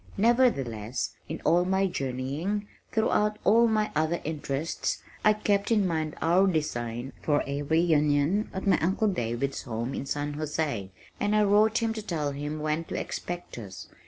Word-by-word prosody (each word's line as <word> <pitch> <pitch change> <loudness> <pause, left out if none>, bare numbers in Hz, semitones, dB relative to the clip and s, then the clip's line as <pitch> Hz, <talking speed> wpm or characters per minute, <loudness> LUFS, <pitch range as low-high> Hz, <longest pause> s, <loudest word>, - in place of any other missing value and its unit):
Nevertheless, 140 - +1 0.2
in 160 - -5
all 175 +1 +4
my 190 +1 +2
journeying, 150 +6 -2 0.2
throughout 210 -1 +2
all 230 +3 +5
my 215 -1 +1
other 160 +3 +1
interests, 150 0 -2 0.2
I 215 - +6
kept 205 -1 0
in 215 -4 +3
mind 160 -3 -1
our 180 +4 +4
design 120 -7 -2
for 145 -1 +2
a 140 +1 -3
reunion 155 +4 +2
at 190 - -5
my 195 - +4
uncle 190 +6 +1
David's 135 - -2
home 120 +1 -4
in 140 - -4
San 145 +1 -2
José, 150 -9 -2 0.3
and 205 +1 +1
I 210 - +5
wrote 215 +3 +4
him 225 -1 +1
to 220 - -5
tell 160 -8 -2
him 145 +2 -4
when 155 +2 0
to - - -4
expect 175 -7 -5
us. 95 -4 -9
160 Hz, 160 wpm, -28 LUFS, 140-205 Hz, 0.3 s, I